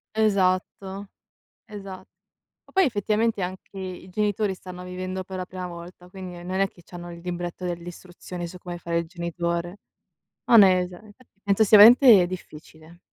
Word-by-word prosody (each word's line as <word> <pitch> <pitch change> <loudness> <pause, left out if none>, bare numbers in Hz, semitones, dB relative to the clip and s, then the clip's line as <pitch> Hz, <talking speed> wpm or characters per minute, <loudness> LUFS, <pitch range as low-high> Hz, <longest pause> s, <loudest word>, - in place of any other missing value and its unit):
Esatto, 195 -1 0 0.6
esa 200 -3 -8
Ma 185 - -26 0.4
poi 380 -1 +4
effettivamente 215 -2 0
anche 185 +2 -7
i 185 -1 -7
genitori 205 0 0
stanno 180 0 -10
vivendo 185 +1 -5
per 190 0 -8
la 185 - -4
prima 185 -1 -6
volta, 175 +1 -11
quindi 185 -1 -8
non 185 +2 -3
è 195 - +2
che 175 - -20
c'hanno 175 -1 -10
il 170 - -10
libretto 175 0 -5
delle 175 -1 -4
istruzioni 175 0 -8
su 180 +2 -10
come 175 -1 -7
fare 170 -1 -2
il 170 - -3
genitore. 170 +1 -4 0.7
No - - +4
hai 195 -4 +8
ragione, 185 +4 -9
fatti 250 -6 -26
penso 200 +1 +3
sia 210 - +7
veramente 230 -3 +9
difficile. 160 -2 -11
185 Hz, 165 wpm, -24 LUFS, 175-200 Hz, 0.7 s, veramente